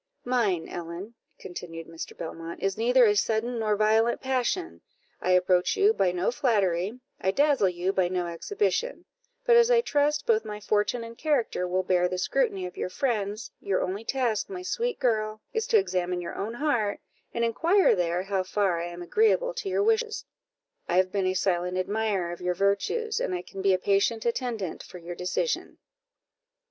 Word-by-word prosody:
"Mine, 215 -9 +1
Ellen," 175 +5 -7 0.2
continued 165 -2 -8
Mr. 165 0 -8
Belmont, 165 +1 -6
"is 195 -1 -1
neither 245 +3 +4
a 210 -1 +4
sudden 225 +3 0
nor 215 -1 +1
violent 220 +3 +3
passion; 265 +7 -1 0.4
I 185 - +2
approach 180 0 +3
you 410 +2 +5
by 185 - +2
no 180 +4 0
flattery 205 -4 0 0.2
I 190 - 0
dazzle 275 -3 +3
you 180 +2 -1
by 185 -2 +2
no 180 0 -1
exhibition; 410 - -2 0.4
but 480 -1 +6
as 470 0 +6
I 480 -1 +5
trust 295 -7 +1
both 225 -1 +3
my 210 -1 -6
fortune 210 +3 0
and 230 0 -9
character 255 - 0
will 185 +1 0
bear 180 -1 +2
the 185 - -3
scrutiny 195 -2 0
of 180 - -8
your - - -2
friends, 215 -3 -2
your 195 -2 0
only 195 +4 -3
task, 240 - -1
my 370 -2 -6
sweet 475 +5 -1
girl, 215 -4 0
is 450 0 -1
to 465 - +5
examine 180 - 0
your 175 - -5
own 220 +4 -4
heart, 240 -8 0 0.3
and 235 - 0
inquire 335 - +3
there 175 0 0
how 195 -1 0
far 185 -2 0
I 170 - -3
am 175 0 -7
agreeable 450 - +2
to 480 -5 -4
your 400 - +1
wishes. 445 0 +1 0.6
I 175 - +2
have 185 0 +3
been 195 -1 0
a 185 - 0
silent 180 -1 0
admirer 195 -2 -1
of 175 - -8
your 180 0 0
virtues, 200 - 0
and 185 - -1
I 180 - -4
can 195 - -8
be 195 0 +3
a 185 - +4
patient 200 +4 +1
attendant 235 -6 -2
for - - -11
your 175 0 -7
decision." 180 - -2
210 Hz, 185 wpm, -27 LUFS, 180-255 Hz, 0.6 s, but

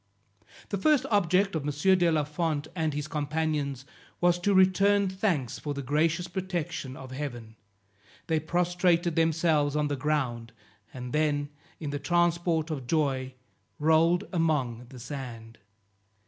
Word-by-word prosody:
The 200 - -2
first 285 +3 +3
object 195 0 +3
of 160 - -1
M. 150 +7 +2
de 175 -1 +4
la 155 -2 +2
Fond 150 0 -2
and 160 -3 0
his 150 0 -3
companions 150 -3 -2 0.3
was 175 0 +3
to 200 +3 +1
return 195 +2 +4
thanks 185 - -1
for 145 -1 -4
the 140 - -4
gracious 155 +6 +1
protection 175 -7 -4
of 130 -1 -10
Heaven; 120 -5 -6 0.7
they 160 -1 +1
prostrated 175 +1 +1
themselves 160 -3 +2
on 150 -1 +1
the 145 - 0
ground, 130 -5 -2 0.4
and 125 0 -7
then 145 -2 +1 0.3
in 150 -3 -4
the 145 - -3
transport 170 0 +1
of 135 -5 -5
joy 135 -4 0 0.4
rolled 160 +3 +3
among 135 -8 0
the 130 - -11
sand. 120 -4 -8
155 Hz, 140 wpm, -28 LUFS, 140-175 Hz, 0.7 s, de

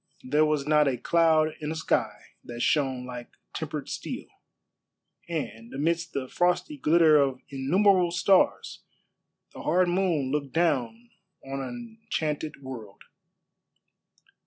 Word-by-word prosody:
There 150 +4 +2
was 150 -2 0
not 150 -1 +4
a 130 -2 0
cloud 160 +3 +3
in 150 0 -4
a - - -3
sky 110 -9 0 0.3
that 120 0 -7
shone 130 -4 +1
like 125 -1 -8 0.2
tempered - - -5
steel; - - -5 1.0
and 120 -8 -5
amidst 170 +4 -1
the 135 -2 -3
frosty 180 - 0
glitter 160 - +5
of 135 -2 0
innumerable 180 +7 +3
stars 185 +2 +2 0.7
the - - -9
hard 180 +3 +2
moon 175 -7 0
looked 140 -2 -2
down 120 -8 0 0.3
on 135 0 -4
an 230 - -8
enchanted 155 -8 -3
world. 110 -6 -9
150 Hz, 125 wpm, -27 LUFS, 130-170 Hz, 1.0 s, glitter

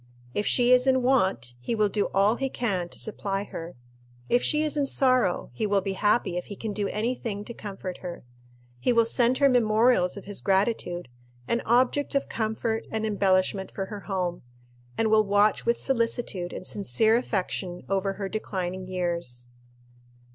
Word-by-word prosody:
If 205 - -1
she 245 0 +3
is 250 +1 +5
in 260 -1 +3
want, 190 - +1
he 125 - -2
will 215 -1 +3
do 205 0 0
all 200 +4 +3
he 270 0 -1
can 195 -9 -2
to - - -8
supply 200 -2 -3
her. 170 -4 -8 0.5
If 245 +1 +3
she 300 0 +2
is 305 -1 0
in 285 -2 +1
sorrow, 255 - +2
he 210 - -1
will 200 -1 +2
be 195 0 -3
happy 205 -2 +1
if 180 - -3
he 205 - -8
can 215 +1 -5
do 205 -1 -1
any 225 +5 -1
thing 210 -4 -5
to 235 - -7
comfort 195 -4 -7
her. 175 -2 -7 0.6
He 250 - +2
will 230 -1 +4
send 240 +2 +2
her 280 - +5
memorials 225 -5 +3
of 200 - -9
his 205 0 -3
gratitude, 190 - 0 0.4
and 235 - 0
objects 255 +5 +2
of 275 - +1
comfort 220 0 -2
and 220 0 -2
embellishment 190 -2 +1
for 195 - -4
her 205 +1 -7
home, 180 -3 -3 0.6
and 220 -1 +1
will 215 0 +5
watch 205 +2 +2
with 235 - +3
solicitude 230 -8 -1
and - - -7
sincere 205 - +2
affection 190 -6 -2
over 195 0 0
her 195 0 -4
declining 185 -3 -4
years. 170 -10 -3
205 Hz, 180 wpm, -26 LUFS, 185-235 Hz, 0.6 s, is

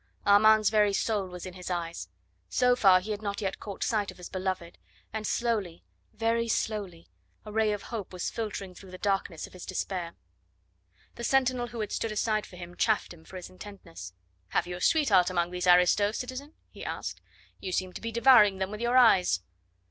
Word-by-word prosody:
Armand's 215 +1 +6
very 210 -2 +3
soul 205 -1 0
was 180 0 -8
in 185 - -7
his 180 0 -8
eyes. 170 - -4 0.4
So 250 0 +3
far 190 -6 +5
he 215 +3 -5
had 210 0 -3
not 200 -1 -3
yet 195 -3 -3
caught 200 -2 -5
sight 210 -3 0
of - - -10
his 180 - -9
beloved, 185 -2 -4 0.3
and 220 -1 -3
slowly 210 -8 -1 0.3
very 230 +1 0
slowly 205 -6 -2 0.4
a 210 - -8
ray 220 0 +2
of 205 -1 -3
hope 210 -5 -4
was 180 -1 -3
filtering 205 -4 -5
through 190 +1 -13
the 185 - -9
darkness 195 -4 -1
of - - -15
his 185 - -10
despair. 180 -2 -4 1.0
The 235 - -6
sentinel, 255 -1 +2
who 235 -1 -6
had 210 - -4
stood 225 - -2
aside 215 0 0
for - - -14
him, 175 0 -9
chaffed 215 -3 +1
him 160 -2 -16
for - - -13
his 180 -1 -8
intentness. 185 - -10 0.3
"Have - - 0
you 180 0 -5
a 180 - -8
sweetheart 205 - +4
among 175 -1 0
these 180 0 -3
aristos, 180 +4 +4
citizen?" 260 +4 -6 0.2
he - - -10
asked. - - -5 0.4
"You 185 - -5
seem 185 0 -2
to - - -8
be 230 - -4
devouring 230 -4 +6
them 190 +1 -2
with 210 +1 -6
your 240 +2 +2
eyes." 190 - +5
200 Hz, 200 wpm, -28 LUFS, 180-220 Hz, 1.0 s, Armand's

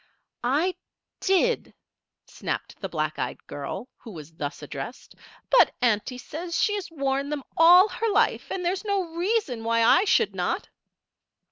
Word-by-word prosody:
"I 300 +9 +1 0.5
did," 390 +5 +1 0.5
snapped - - -5
the 195 - -4
black 155 -2 -2
eyed - - -4
girl 145 - -6
who 235 - -12
was 160 -5 -10
thus 145 -2 -5
addressed. - - -7 0.4
"But - - +5
auntie 240 +1 +1
says 330 +6 -5
she 415 - +2
has 395 -2 -4
worn 275 -2 -1
them 295 -2 -3
all 355 +4 +8
her 455 +1 -2
life, 430 +3 +1
and 360 -2 -3
there 350 - +2
is 385 - -5
no 390 -5 -1
reason 345 - -1
why 230 0 +2
I 350 - +5
should - - +3
not." - - -2
310 Hz, 155 wpm, -26 LUFS, 230-380 Hz, 0.5 s, all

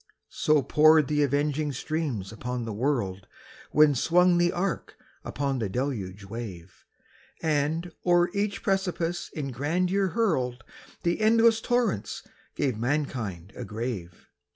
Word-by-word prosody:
So 150 -2 +2
poured 155 0 +5
the 150 +1 +1
avenging 145 +1 +1
streams 135 - -3
upon 125 +1 -4
the 110 - -4
world 100 -6 -1 0.4
When 150 -1 +6
swung 175 +6 +3
the 175 0 +3
ark 180 0 -3 0.3
upon 140 -2 -2
the 110 -4 -2
deluge 105 -5 -3
wave, 95 -4 -8 0.6
And, 160 +3 0
o'er 175 0 +3
each 200 0 -2
precipice 180 -3 -1
in 140 -4 -3
grandeur 180 - 0
hurled, 135 - 0 0.4
The 175 +4 0
endless 225 +1 +5
torrents 230 - -1 0.3
gave 125 -6 -1
mankind 115 - -2
a 125 - -6
grave. 110 -6 -5
145 Hz, 125 wpm, -27 LUFS, 115-175 Hz, 0.6 s, When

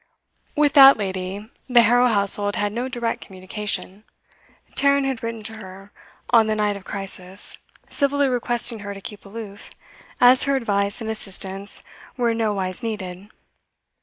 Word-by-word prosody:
With 295 -2 +3
that 275 -2 +9
lady 190 0 -4 0.2
the 240 -2 +6
Harrow 245 +3 +4
household 205 -2 +2
had 205 0 -1
no 240 +3 -2
direct 240 -3 -3
communication; 195 +1 -5 0.7
Tarrant 280 0 +3
had 265 -3 -2
written 230 -1 -5
to 220 +1 -4
her 195 0 -12 0.4
on 230 -2 +5
the 215 - 0
night 210 -1 0
of 200 - -9
crisis, 195 -1 -4 0.3
civilly 285 0 +1
requesting 240 -2 0
her 200 0 -7
to - - -8
keep 205 +1 -10
aloof, 205 -1 -9 0.5
as 250 +2 +7
her 275 0 +1
advice 200 -4 -1
and 220 - -4
assistance 195 -1 -2 0.3
were 240 -2 +1
in 225 - -3
nowise 200 -3 -1
needed. 200 -4 -6
215 Hz, 150 wpm, -22 LUFS, 200-240 Hz, 0.7 s, that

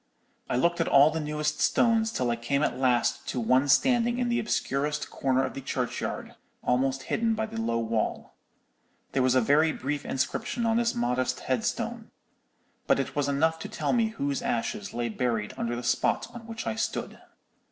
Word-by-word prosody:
"I - - 0
looked 170 +6 +2
at - - 0
all 140 +2 +6
the 160 - -2
newest 150 0 -2
stones 225 -1 +3
till 125 - 0
I - - +1
came 140 +5 -1
at - - 0
last 125 -2 +1
to 125 - -2
one 130 +4 +3
standing 240 - +3
in 245 -1 0
the 235 - +1
obscurest 150 -6 -1
corner 130 0 +1
of - - -3
the 135 - -6
churchyard, 125 -1 -3 0.3
almost 130 +1 +1
hidden 225 - 0
by 220 0 -1
the 225 +1 -5
low 115 - 0
wall. 115 -1 -2 0.8
"There 135 - +1
was 130 0 +3
a 130 - +5
very 150 +6 +4
brief 145 0 -3
inscription 135 - -2
on 225 0 +2
this 235 0 +1
modest 125 +2 0
headstone; - - -2 0.8
but - - +4
it - - -3
was 145 -1 0
enough 160 +3 +1
to - - -6
tell - - -1
me 230 -2 +3
whose 140 -11 -2
ashes 205 - -2
lay 120 0 -2
buried 115 -2 -1
under 120 0 -2
the 120 - -5
spot 120 - +1
on 235 -2 -10
which 225 0 -6
I 110 - -1
stood. 110 - -3
140 Hz, 190 wpm, -27 LUFS, -, 0.8 s, all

